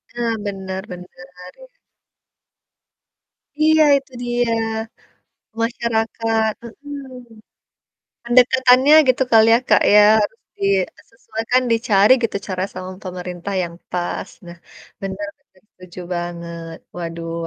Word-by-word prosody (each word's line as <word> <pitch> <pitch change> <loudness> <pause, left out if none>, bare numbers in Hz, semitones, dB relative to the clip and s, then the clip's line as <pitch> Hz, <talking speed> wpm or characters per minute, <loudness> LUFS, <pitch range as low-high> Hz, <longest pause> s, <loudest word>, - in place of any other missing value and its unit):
Nah 235 -1 -1
bener 190 -1 -5
bener, 180 0 -11 0.3
iya. - - -18 1.8
Iya 315 0 +5
itu 275 -1 -9
dia 240 -1 0 1.1
masyarakat 225 -1 -1
mhm, 280 +3 -9 1.1
pendekatannya 255 +3 +5
gitu 255 +1 +3
kali 225 -1 +6
ya, 230 - +5
Kak, - - +4
ya 210 - +8 0.2
harus 210 +2 -3 0.2
di, - - -6 0.3
eee, - - -20
sesuaikan, 230 +2 -1
dicari 225 -2 +3
gitu 220 -3 -1
cara 185 -1 -2
sama 185 0 -7
pemerintah 180 0 -6
yang 170 -1 -7 0.2
pas, 180 +2 -3 0.2
nah 170 0 -11 0.4
bener 195 +1 -5
bener 185 - -31
setuju 185 -1 -13 0.2
banget. 170 -1 -6 0.2
Waduh 165 -1 -5
220 Hz, 110 wpm, -20 LUFS, 180-240 Hz, 1.8 s, ya